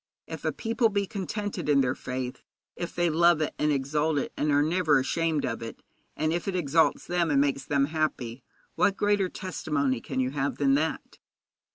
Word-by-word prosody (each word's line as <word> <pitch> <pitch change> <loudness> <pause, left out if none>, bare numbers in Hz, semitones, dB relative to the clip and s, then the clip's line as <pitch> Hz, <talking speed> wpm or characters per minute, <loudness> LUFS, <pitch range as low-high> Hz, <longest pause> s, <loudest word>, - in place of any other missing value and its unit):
If - - -8
a - - +2
people 230 0 +1
be 200 -1 0
contented 200 -3 -4
in 140 -2 +5
their 130 -1 +1
faith, 125 0 -5 0.3
if 175 -1 -5
they 175 0 +2
love 170 0 +4
it 155 - -1
and 150 0 +2
exalt 150 +3 0
it, 140 - -2
and 150 0 0
are 145 0 +4
never 160 -2 +3
ashamed 155 +3 0
of 115 -1 -3
it, 115 - -8 0.3
and 155 +1 +1
if 175 +2 -3
it 195 - -1
exalts 160 -1 +2
them 175 -2 0
and 140 -2 +3
makes 140 -1 +1
them 140 -1 +2
happy, 140 -6 -2 0.3
what 200 - +2
greater 205 -2 +2
testimony 140 -10 -2
can - - -4
you 130 0 0
have 140 0 -2
than 140 -1 +3
that? 155 +3 -2
155 Hz, 195 wpm, -27 LUFS, 140-175 Hz, 0.3 s, in